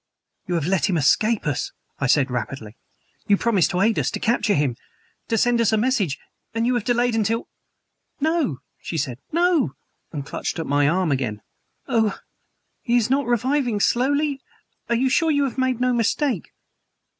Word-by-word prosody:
"You 175 - -1
have 165 -4 0
let 190 +3 +1
him 180 - +1
escape 215 +9 +2
us!" 145 -4 -2 0.3
I 135 - 0
said 135 0 +3
rapidly. 125 -3 -5 0.5
"You 200 - +4
promised 205 -7 +2
to 180 - 0
aid 220 +2 +3
us - - 0
to - - -4
capture 220 -3 +1
him 145 -6 +1 0.5
to 225 - 0
send 240 +1 +3
us 225 - +3
a 220 - +3
message 215 - +1 0.4
and 230 0 +1
you 250 - +2
have 240 -3 0
delayed 245 0 +1
until 225 +1 0 0.4
" - - -52
"No," 290 - -1 0.2
she 165 - -4
said; 130 -5 -2
"no!" 335 - +2 0.4
and 145 -4 -5
clutched - - -4
at 165 - -3
my 145 0 +2
arm 180 -1 +1
again. 120 -6 -2 0.4
"Oh! 225 -6 +1 0.7
is 240 -2 +2
he - - +3
not 280 -1 0
reviving 245 -1 +1
slowly? 280 +5 +1 0.5
Are 235 - +2
you 255 +3 +2
sure 320 +5 +2
you 285 -2 +2
have 265 -1 -3
made 260 -2 +1
no 250 0 +2
mistake?" 235 - 0
225 Hz, 180 wpm, -23 LUFS, 160-250 Hz, 0.7 s, You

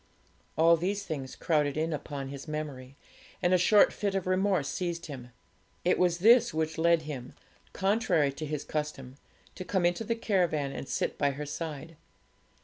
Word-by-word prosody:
All 165 +1 +6
these 195 +4 -2
things 140 -8 -5
crowded 150 -3 0
in 160 +1 0
upon 140 -2 -5
his 140 +1 -8
memory, 140 -4 -6 0.4
and 180 0 +2
a - - +6
short 205 +4 +5
fit 200 -2 -2
of 195 - -1
remorse 185 -4 +1
seized 170 +2 -3
him. 130 -5 -8 0.6
It 180 - +3
was 175 -2 +3
this 230 +2 +5
which 160 0 -1
led 170 -1 +3
him, 135 -5 -7 0.4
contrary 190 -7 +1
to 155 +3 -5
his 150 -1 -3
custom, 140 -4 -5 0.4
to - - -7
come 185 0 0
into 175 +5 +1
the 230 +1 -1
caravan 175 -10 0
and 135 - -7
sit - - -2
by 145 - +3
her 150 +2 -5
side. 155 +1 -6
160 Hz, 170 wpm, -29 LUFS, 145-185 Hz, 0.6 s, All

